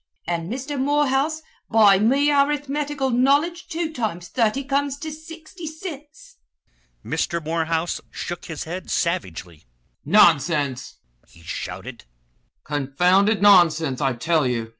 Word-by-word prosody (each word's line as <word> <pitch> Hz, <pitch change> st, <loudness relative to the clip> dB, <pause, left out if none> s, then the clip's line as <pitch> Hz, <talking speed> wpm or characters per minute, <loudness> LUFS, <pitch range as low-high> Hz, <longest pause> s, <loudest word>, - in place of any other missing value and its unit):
An' 170 Hz, 0 st, -3 dB
Mister 270 Hz, +4 st, -4 dB
Morehouse, 290 Hz, +2 st, +1 dB, 0.3 s
by 205 Hz, -3 st, +5 dB
me 275 Hz, +7 st, +3 dB
arithmetical 285 Hz, -1 st, 0 dB
knowledge 285 Hz, +8 st, +1 dB
two 325 Hz, -1 st, -3 dB
times 180 Hz, -, -4 dB
thurty 230 Hz, +6 st, 0 dB
comes 280 Hz, 0 st, 0 dB
to 310 Hz, +2 st, -6 dB
sixty 320 Hz, +2 st, -10 dB
cints." 315 Hz, -, -10 dB, 0.7 s
Mr. 170 Hz, -, -1 dB
Morehouse 165 Hz, +1 st, -1 dB
shook 175 Hz, 0 st, -6 dB
his 160 Hz, -3 st, -6 dB
head 175 Hz, +3 st, -7 dB
savagely. 90 Hz, -, -3 dB, 0.4 s
"Nonsense!" 145 Hz, -6 st, +2 dB, 0.3 s
he 85 Hz, -, -20 dB
shouted, 95 Hz, -, -7 dB, 0.6 s
"confounded 180 Hz, +9 st, +1 dB
nonsense, 165 Hz, -8 st, +4 dB
I 135 Hz, -2 st, +1 dB
tell 155 Hz, +3 st, +1 dB
you! 115 Hz, -2 st, -2 dB
210 Hz, 115 wpm, -22 LUFS, -, 0.7 s, by